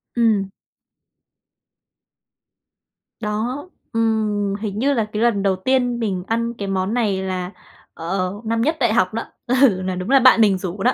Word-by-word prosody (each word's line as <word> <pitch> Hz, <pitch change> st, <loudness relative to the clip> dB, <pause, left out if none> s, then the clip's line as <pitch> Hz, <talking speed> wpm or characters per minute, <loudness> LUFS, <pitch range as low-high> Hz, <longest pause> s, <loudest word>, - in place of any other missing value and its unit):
Ừm. 215 Hz, -5 st, +2 dB, 2.7 s
Đó, 230 Hz, +9 st, -3 dB, 0.3 s
ừm, 215 Hz, -3 st, 0 dB
hình 205 Hz, 0 st, -4 dB
như 280 Hz, +3 st, +2 dB
là 225 Hz, -4 st, +1 dB
cái 215 Hz, -, -1 dB
lần 220 Hz, -4 st, +2 dB
đầu 195 Hz, -1 st, +2 dB
tiên 245 Hz, +3 st, 0 dB
mình 190 Hz, -5 st, -2 dB
ăn 230 Hz, +1 st, -1 dB
cái 200 Hz, -4 st, -6 dB
món 190 Hz, +2 st, -1 dB
này 205 Hz, -6 st, 0 dB
là, 185 Hz, -1 st, -3 dB, 0.4 s
ờ, 185 Hz, +2 st, -2 dB
năm 225 Hz, +1 st, 0 dB
nhất 310 Hz, +5 st, +1 dB
đại 235 Hz, -4 st, +2 dB
học 185 Hz, -5 st, +2 dB
đó, 230 Hz, -, -2 dB, 0.2 s
ừ, 245 Hz, -7 st, +3 dB
là 185 Hz, 0 st, -2 dB
đúng 185 Hz, +5 st, -5 dB
là 275 Hz, -, +6 dB
bạn 255 Hz, -2 st, +6 dB
mình 200 Hz, -3 st, +4 dB
rủ 190 Hz, +2 st, -5 dB
đó. 250 Hz, -, +3 dB
215 Hz, 165 wpm, -21 LUFS, 190-235 Hz, 2.7 s, là